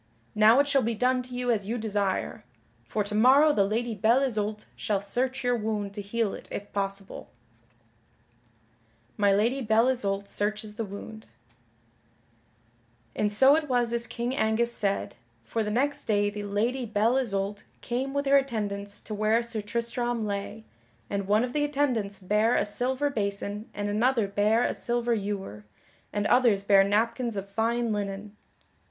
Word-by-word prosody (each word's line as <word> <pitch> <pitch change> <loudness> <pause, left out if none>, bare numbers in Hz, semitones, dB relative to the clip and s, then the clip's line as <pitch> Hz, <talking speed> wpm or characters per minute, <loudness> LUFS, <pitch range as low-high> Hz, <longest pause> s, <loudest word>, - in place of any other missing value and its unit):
Now 220 +2 +6
it 285 - +3
shall 280 -1 +3
be 230 0 -1
done 250 +3 +2
to 250 0 -9
you 245 0 0
as 205 -4 -1
you 235 +3 -2
desire, 205 -1 -2 0.4
for 210 - -2
to 205 +1 -6
morrow 270 +8 +6
the 200 - +3
Lady 225 +4 -1
Belle 225 +5 +3
Isoult 215 -4 -2
shall 205 -2 -1
search 250 +6 -2
your 245 0 +2
wound 210 -3 -3
to 205 - -5
heal 210 +1 -1
it - - -9
if 205 - -6
possible." 195 -1 -4 0.4
[Sidenote: 115 0 -37
My 200 -1 +4
Lady 230 +7 +2
Belle 225 +1 +3
Isoult 200 -6 -1
searches 210 +1 -2
the 225 +1 -4
wound] 215 +2 -9 1.9
And 210 -1 0
so 265 +7 +6
it 310 -2 -1
was 240 -2 +1
as 235 0 0
King 240 +2 -3
Angus 230 0 +1
said, 200 - -1 0.3
for 225 - -2
the 210 - -1
next 275 +7 0
day 205 -1 +1
the 205 0 -6
Lady 230 +5 -1
Belle 220 +4 +2
Isoult 200 -4 -2 0.2
came 260 +3 -2
with 280 +1 -1
her 280 0 +5
attendants 205 -6 -3
to 215 - -7
where 215 +2 +2
Sir 230 -2 -3
Tristram 235 +2 -2
lay, 205 +2 -5 0.5
and 200 -1 -2
one 210 +3 +3
of 250 0 -3
the 295 - +1
attendants 255 -9 -1
bare 210 +5 +2
a - - +2
silver 260 +7 -1
basin 205 -1 -3
and 205 0 -4
another 225 +1 +1
bare 210 +4 +2
a - - 0
silver 240 0 -1
ewer, 195 - -4 0.5
and 205 0 -1
others 230 -6 +3
bare 200 -1 +6
napkins 230 +3 0
of 195 0 -4
fine 230 +2 0
linen. 205 0 -4
215 Hz, 170 wpm, -27 LUFS, 200-240 Hz, 1.9 s, Now